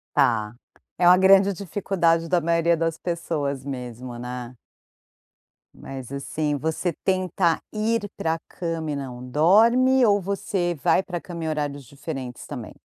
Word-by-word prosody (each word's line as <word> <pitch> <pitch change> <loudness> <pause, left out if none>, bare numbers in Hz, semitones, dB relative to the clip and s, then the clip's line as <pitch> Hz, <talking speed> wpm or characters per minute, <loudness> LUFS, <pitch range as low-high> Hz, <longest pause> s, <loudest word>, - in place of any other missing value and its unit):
Tá, 110 -2 +2 0.4
é 175 0 +4
uma 180 +1 +8
grande 195 +1 +6
dificuldade 170 -3 0
da 175 -1 +2
maioria 170 +1 +2
das 165 0 -1
pessoas 150 -6 -3
mesmo, 125 -2 -6
né. 125 0 -7 1.2
Mas 130 -2 -9
assim, 145 +2 -2
você 160 +4 -1
tentar 185 -3 +1
ir 215 -1 -1
para 160 0 0
a - - -8
cama 165 -3 -4
e - - -2
não 125 -3 -6
dorme, 235 - +5
ou 205 -1 +4
você 185 -2 -1
vai 190 - +4
pra 175 -2 -5
cama 170 -2 -7
em - - -2
horários 145 -2 -3
diferentes 135 -2 -7
também? - - -7
165 Hz, 145 wpm, -24 LUFS, 140-185 Hz, 1.2 s, uma